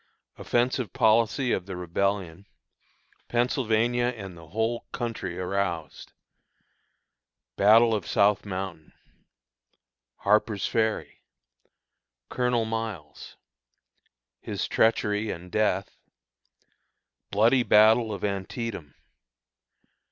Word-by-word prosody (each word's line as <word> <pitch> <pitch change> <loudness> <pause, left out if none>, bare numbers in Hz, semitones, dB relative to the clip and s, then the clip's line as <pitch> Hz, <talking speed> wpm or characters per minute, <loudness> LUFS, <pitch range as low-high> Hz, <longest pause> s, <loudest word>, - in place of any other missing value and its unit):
Offensive 120 -3 0
Policy 115 +3 +2
of 95 - -1
the 95 - -5
Rebellion. 90 +1 -2 0.8
Pennsylvania 120 -1 +1
and 100 -7 -5
the 85 -1 -14
Whole 110 +6 -2
Country 110 -7 -4
Aroused. 90 -4 -3 1.4
Battle 115 +3 +5
of 105 -5 -2
South 105 0 +3
Mountain. 95 -5 -6 1.2
Harper's 105 0 +1
Ferry. 110 -1 -1 1.1
Colonel 125 -2 0
Miles. 110 -10 -6 1.0
His - - -4
Treachery 110 -1 +1
and 90 0 -7
Death. 100 -3 -1 1.3
Bloody 115 +5 +3
Battle 110 0 +5
of 100 -3 -6
Antietam. 100 - -4
105 Hz, 80 wpm, -26 LUFS, 95-115 Hz, 1.4 s, Battle